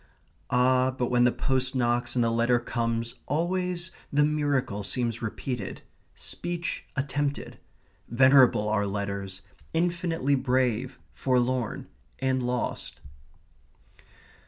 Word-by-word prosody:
Ah, 130 +1 +3
but 125 -2 -2
when 120 0 +4
the 125 - +5
post 130 0 0
knocks 120 0 +1
and 120 - +3
the 115 - +2
letter 115 +1 +3
comes 115 -1 -2
always 175 +3 -1 0.2
the 145 +1 +4
miracle 145 -8 0
seems 115 +3 -1
repeated 115 -1 -4 0.3
speech 175 0 -4
attempted. 140 +1 -2 0.5
Venerable 130 -3 +5
are 105 -1 +1
letters, 100 -1 -4 0.3
infinitely 170 -4 +1
brave, 130 -1 +1 0.2
forlorn, 125 -2 0 0.3
and 130 -1 0
lost. 125 0 -3
125 Hz, 105 wpm, -27 LUFS, 115-140 Hz, 0.5 s, the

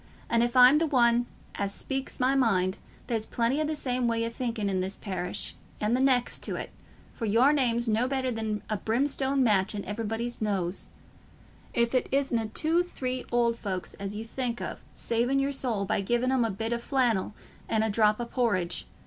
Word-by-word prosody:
An' 230 0 +4
if 240 +1 +1
I'm 255 +4 +8
th' 325 -1 +1
only - - -9
one 240 -1 +4 0.3
as 200 -1 -2
speaks 270 +6 -4
my 255 +1 +3
mind, 195 -8 +2 0.3
there's 225 -2 -2
plenty 240 +5 0
o' - - +1
the 310 +1 -1
same 250 -4 0
way 230 0 +1
o' 230 - -3
thinking 230 -3 -2
i' 195 - -1
this 190 +2 -2
parish 185 -3 -3 0.3
and 215 +3 +1
the - - +1
next 260 -2 +2
to - - -3
't, - - -6 0.4
for 230 - -4
your 235 +7 +4
name's 240 -4 +1
no 225 +3 +2
better 260 -1 -1
than 220 -2 -3
a 215 - -1
brimstone 270 +5 +1
match 205 -3 +2
in 200 - -4
everybody's 225 +3 -3
nose—if 205 +4 -4
it 255 - +1
isna 255 -5 +1
two 320 +9 +2
three 255 -7 -4
old 235 -1 +2
folks 185 -3 -4
as 200 +1 -6
you 220 +2 -5
think 240 0 -3
o' - - -4
saving 240 +4 0
your 275 +1 +1
soul 235 -7 -1
by 205 0 0
giving 240 +5 +1
'em 260 -2 +3
a - - 0
bit 225 +3 -2
o' 235 - -1
flannel 235 -6 0 0.3
and 220 -1 +2
a 220 - +1
drop 215 +1 +3
o' 240 - -2
porridge. 205 -9 0
235 Hz, 200 wpm, -28 LUFS, 215-255 Hz, 0.4 s, I'm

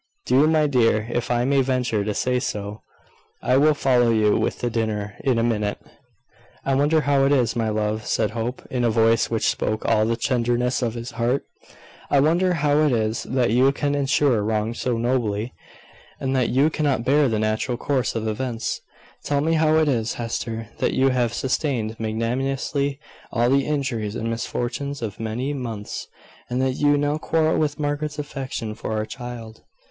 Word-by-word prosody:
Do, 135 +4 +4
my 155 -1 +3
dear, 115 -6 +2
if 120 0 -2
I 120 0 +1
may 135 0 +3
venture 125 -5 0
to 105 0 -2
say 125 0 +1
so. 105 -3 -4 0.6
I 125 - +3
will 150 +2 +4
follow 125 -4 +3
you 110 -2 +3
with - - 0
the 120 - -2
dinner 105 -3 -2
in 130 -3 +2
a 115 - +2
minute." 105 -3 0 0.9
"I 135 - +1
wonder 145 +4 +3
how 140 -2 +2
it 140 - +2
is, 125 -4 +2
my 115 -2 0
love," 110 0 -1
said 110 -2 +1
Hope, 115 +3 -4
in 125 -2 0
a 120 - +3
voice 115 0 +3
which 115 -1 0
spoke 110 0 -1
all 110 0 +3
the 115 - +1
tenderness 120 +1 0
of 120 -2 -1
his 120 +1 -6
heart; 120 +3 0 0.7
"I 140 - +4
wonder 170 +6 +3
how 145 -1 +2
it 155 -2 +3
is 110 -1 0
that 125 -3 +1
you 130 +4 +4
can 145 0 -1
endure 140 -4 +2
wrong 110 +1 -1
so 120 0 -1
nobly, 115 -2 -1 0.7
and 135 0 -1
that 130 -3 +2
you 140 +5 +3
cannot 140 -7 0
bear 140 0 +4
the 110 - 0
natural 110 +3 -1
course 130 -1 -1
of 110 -1 -2
events. 115 +1 -3 0.4
Tell 145 -1 0
me 160 +2 +1
how 155 -1 +3
it 160 -1 +3
is, 115 -5 0
Hester, 115 -1 -4
that - - +1
you 135 +1 +4
have 125 -3 +1
sustained 120 -3 -1
magnanimously 135 +5 -1 0.3
all 120 +1 +2
the 140 0 +2
injuries 125 -8 -2
and 115 0 -2
misfortunes 125 +4 -3
of 105 -3 -5
many 115 +6 -2
months, 115 -6 -5 0.4
and 125 - -1
that 130 0 +1
you 145 +2 +3
now 145 +1 0
quarrel 160 0 +1
with 150 -1 -1
Margaret's 145 0 -2
affection 135 -6 -4
for 110 0 -5
our 110 0 -1
child." 120 -2 -8
125 Hz, 185 wpm, -23 LUFS, 115-140 Hz, 0.9 s, Do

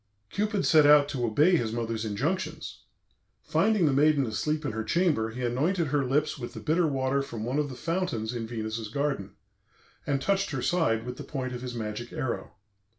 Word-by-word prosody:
Cupid 210 -1 0
set 155 -2 +6
out 145 -1 +7
to 125 -5 -1
obey 150 +11 +4
his 115 -6 -1
mother's 115 -1 -2
injunctions. 145 - -3 0.6
Finding 215 -5 +2
the 145 - +3
maiden 145 0 +4
asleep 150 +7 -2
in 135 - -1
her 110 +1 -3
chamber, 150 - +1
he 125 +3 -6
anointed 155 +7 0
her 145 0 +1
lips 150 +4 0
with 120 - -6
the - - -5
bitter 165 +2 +2
water 135 -1 0
from 120 -6 -6
one 125 +6 -1
of 145 -1 -1
the 130 - -7
fountains 130 -6 -2
in 115 -2 -4
Venus's 110 -1 -4
garden, 140 -5 -2 0.7
and 140 -1 +1
touched 195 +6 +1
her - - -3
side 120 -11 +1
with 125 0 -6
the - - -6
point 130 -3 -4
of 125 - -5
his 125 -1 -5
magic 115 +1 -5
arrow. 120 - -4
135 Hz, 195 wpm, -28 LUFS, 115-155 Hz, 0.7 s, out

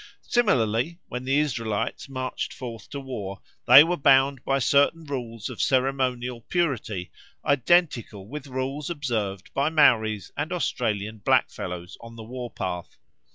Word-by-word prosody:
Similarly, 130 - +1
when 125 +1 -5
the 135 +2 +2
Israelites 115 -5 -1
marched 130 -1 -4
forth 115 -5 -8
to 140 - -5
war 105 -8 -6 0.3
they 145 - +11
were 175 +2 -1
bound 135 -1 +4
by 135 - +1
certain 145 +5 +3
rules 120 -6 -5
of - - -5
ceremonial 125 -2 0
purity 120 - -1 0.3
identical 130 - +2
with 150 +4 -7
rules 135 +3 -3
observed 110 - -3
by 140 +2 +1
Maoris 110 - +3
and 150 +3 -3
Australian 110 - -2
blackfellows 90 -3 -1
on 115 0 -11
the 115 - -9
war 125 +1 -6
path. 90 -5 -5
125 Hz, 135 wpm, -25 LUFS, 110-140 Hz, 0.3 s, they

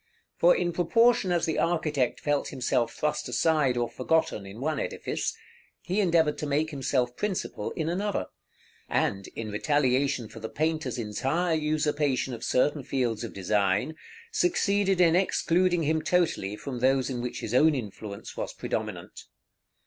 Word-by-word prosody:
For 175 - +5
in 175 -1 0
proportion 205 +3 +3
as 175 -2 +2
the 160 - -1
architect 155 -6 0
felt 145 -1 0
himself 125 -3 0
thrust 150 -3 -2
aside 135 0 +2
or 120 0 +1
forgotten 160 -12 0
in 100 +4 -10
one 150 +2 -1
edifice, - - -3 0.5
he 185 +4 -1
endeavored 160 -5 +2
to 150 - -3
make 150 +3 0
himself 130 -3 0
principal 210 -3 -3
in 160 -2 -2
another; 190 - -1 0.6
and, 100 0 0
in 110 -2 -5
retaliation 135 +1 +1
for 115 - -11
the 110 0 -6
painter's 155 -1 -1
entire 135 +10 -1
usurpation 150 -4 0
of 115 - -7
certain 145 +3 +2
fields 120 -4 -1
of 115 - -5
design, 100 - 0 0.4
succeeded 200 - +2
in 170 -2 +5
excluding 180 -1 +2
him 155 +1 +1
totally 160 - +1
from 125 +2 -6
those 130 +1 +2
in 120 -2 -3
which 125 0 -4
his 110 - -4
own 150 +4 +5
influence 105 -4 -7
was - - -4
predominant. - - -5
145 Hz, 150 wpm, -27 LUFS, 125-165 Hz, 0.6 s, For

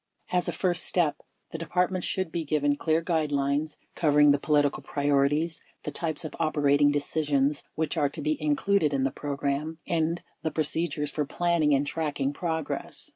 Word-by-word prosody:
369 180 0 +2
As - - -8
a - - -3
first 180 -2 +3
step, 170 -5 +1 0.3
the 160 - -5
Departments 180 +2 0
should 185 -4 -1
be 170 0 -2
given 145 -1 +1
clear 160 +2 0
guidelines 150 -2 0 0.2
covering 150 -2 +4
the 140 - +2
political 145 -1 +2
priorities, 145 +3 +1 0.2
the 150 - -4
types 160 +2 -2
of 155 - -6
op 160 -1 0
erating 145 0 +4
decisions 145 -1 0
which 160 -1 -1
are 145 - +2
to 155 - -8
be 155 +1 +1
included 150 +1 +2
in 135 - +1
the 135 - +1
program, 145 +2 -3
and 165 0 0 0.2
the 160 - -1
procedures 155 -1 -1
for 150 - -1
planning 160 -1 +2
and 140 +1 +1
tracking 145 -2 -2
progress. 160 -2 -3
150 Hz, 175 wpm, -27 LUFS, 145-165 Hz, 0.3 s, covering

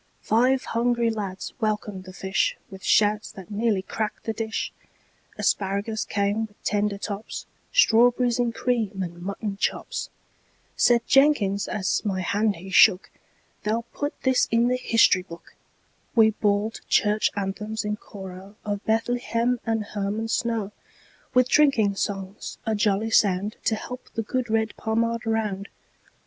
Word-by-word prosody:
Five 255 +4 +3
hungry 235 0 +1
lads 200 -4 -5
welcomed 210 -4 -2
the 185 - -9
fishWith 190 0 -2
shouts 210 +1 +2
that 190 0 -11
nearly 210 -2 +1
cracked 215 +2 -4
the 225 - -2
dish; 220 0 -3 0.6
Asparagus 200 +3 0
came 205 +2 0
with 205 - -29
tender 205 -1 0
tops, 205 +1 -5 0.3
Strawberries 245 - +4
in 240 -1 +2
cream, 225 -5 -1
and 175 -1 -7
mutton 200 +2 -4
chops. - - -2 0.7
Said 235 -1 +4
Jenkins, 250 -9 +3
as 195 -2 -1
my 195 -3 -1
hand 205 +3 +1
he 190 +3 -10
shook,"They'll 215 +2 +2
put 290 0 -4
this 260 -1 +3
in 230 +1 +3
the 250 - +2
history 230 -6 +4
book."We 195 +5 -2
bawled 210 +1 0
Church 210 0 +3
anthems 210 +2 -3
in 210 0 -1
choroOf 190 -1 -10 0.3
Bethlehem 240 +1 0
and 225 -1 +1
Hermon 210 +2 -3
snow, 225 -3 -1 0.6
With 255 0 +5
drinking 255 -9 +4
songs, 195 0 -4
a 220 - 0
jolly 210 +1 +1
soundTo 205 +2 +2
help 250 +3 -8
the 225 - -1
good 250 +2 -2
red 220 0 +1
Pommard 230 +1 -1
round. 210 -3 -1
215 Hz, 130 wpm, -25 LUFS, 200-230 Hz, 0.7 s, With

